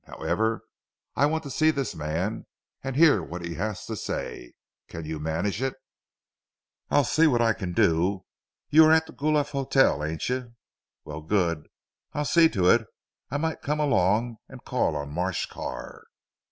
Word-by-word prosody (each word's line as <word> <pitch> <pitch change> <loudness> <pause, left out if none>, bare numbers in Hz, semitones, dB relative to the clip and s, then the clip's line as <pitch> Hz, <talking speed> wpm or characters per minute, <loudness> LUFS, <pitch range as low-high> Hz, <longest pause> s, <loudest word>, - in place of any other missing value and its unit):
However, 110 +1 -1 0.5
I 145 - +4
want 160 +1 -1
to 140 - -7
see 155 +3 +3
this 140 -4 -1
man 80 +8 -3 0.4
and 135 -1 -4
hear 145 - +5
what 85 +1 -6
he 85 - -4
has 105 +2 -4
to - - -4
say. - - -5 0.3
Can 80 -1 -7
you 80 0 -4
manage 85 +8 -2
it?" 135 0 -1 1.1
"I'll 145 - +4
see 160 +6 +3
what 125 -5 +2
I 115 -1 +3
can 95 -5 -5
do. 90 +4 +2 0.5
You 160 +2 +8
are 155 - +5
at 160 0 +5
the - - -13
Guelph 150 0 0
Hotel 135 - +2
ain't 80 +1 -3
you? 125 -2 -3 0.5
Very 75 +1 -7
good. 85 -6 0 0.5
I'll 150 +1 -1
see 165 +2 +5
to 90 - +1
it. 110 +3 +4 0.4
I 145 - -1
might 160 +1 -2
come 150 +2 -1
along 115 -4 +2
and 130 -2 -12
call 125 -11 0
on 70 0 -4
Marsh 90 +3 -1
Carr." - - -7
115 Hz, 170 wpm, -26 LUFS, 85-145 Hz, 1.1 s, You